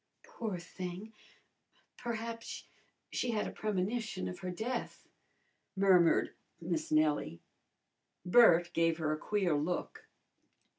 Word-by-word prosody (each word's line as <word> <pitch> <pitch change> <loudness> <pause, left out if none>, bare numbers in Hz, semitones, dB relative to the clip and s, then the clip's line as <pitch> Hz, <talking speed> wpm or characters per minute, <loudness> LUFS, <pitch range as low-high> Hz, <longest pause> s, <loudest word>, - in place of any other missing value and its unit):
"Poor 215 -5 -5
thing! 180 +4 -7 0.8
Perhaps 230 -1 -5 0.5
she 250 - -1
had 210 - 0
a - - -4
premonition 215 - -2
of 90 - -6
her 185 - -4
death," 230 +7 -4 0.7
murmured 185 -3 +4 0.3
Miss 165 -2 -3
Nellie. 155 - +2 0.9
Bert 175 -4 +6
gave 165 -1 +2
her 155 -2 -1
a 155 - -1
queer 195 -4 0
look. 155 +5 -2
180 Hz, 105 wpm, -33 LUFS, 165-220 Hz, 0.9 s, Bert